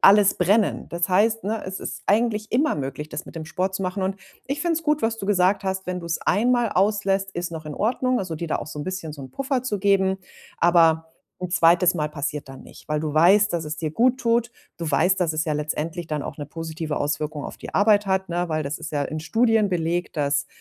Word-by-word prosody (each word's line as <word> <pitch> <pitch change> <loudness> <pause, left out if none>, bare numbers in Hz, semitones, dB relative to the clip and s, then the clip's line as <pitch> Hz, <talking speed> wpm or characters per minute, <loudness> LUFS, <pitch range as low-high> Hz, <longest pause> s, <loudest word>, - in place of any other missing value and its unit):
alles 200 0 +7
brennen. 200 +4 +2
Das 170 +1 -1
heißt, 215 +3 +3
ne, 220 +1 -2
es 190 0 -4
ist - - -6
eigentlich 215 0 +1
immer 280 +6 +2
möglich, 140 +1 -5
das - - -6
mit - - -11
dem 160 - -5
Sport 185 +4 -2
zu 195 - -2
machen 185 +1 -2
und 190 +1 -1 0.3
ich 280 +2 -2
finde 345 -1 +1
es 325 - -3
gut, 300 -1 +1
was 225 0 0
du 195 - -5
gesagt 195 0 +3
hast, 190 0 -2
wenn 180 0 -3
du's 170 -1 -2
einmal 240 +2 +2
auslässt, 195 0 +1
ist 175 0 -3
noch 160 -1 -7
in 150 - -5
Ordnung, 255 +3 +1
also 185 -4 -3
dir 165 +1 -5
da - - +1
auch - - -6
so 150 - -8
'n 145 - -4
bisschen 185 -5 -4
so 145 - -10
'n 130 - -9
Puffer 270 - -1
zu 210 -5 -2
geben. 190 -1 +2 0.4
Aber 165 -2 +4 0.3
'n 180 -1 -5
2. 175 0 +4
Mal 150 -2 -1
passiert 145 -1 -4
dann 135 - -10
nicht, - - -15
weil 150 0 0
du 155 -1 -3
weißt, 195 +7 +5
dass 170 -2 -1
es 150 - -4
dir 155 -1 -3
guttut. 235 - +2 0.3
Du 165 -2 -3
weißt, 185 +4 +3
dass 160 -3 +1
es 160 +2 0
ja 155 - -1
letztendlich 155 +3 -3
dann 150 -3 -2
auch - - -7
'ne 145 - -5
positive 160 -1 -5
Auswirkung 150 0 -2
auf - - -7
die - - -9
Arbeit 205 0 +4
hat, 190 -1 0
ne, 175 0 -1
weil 155 -1 -1
das 140 +2 -4
ist 160 0 -6
ja 145 - 0
in 155 +2 -4
Studien 225 +4 +2
belegt, 175 -1 -1
dass 145 -1 +1
180 Hz, 240 wpm, -24 LUFS, 155-205 Hz, 0.4 s, alles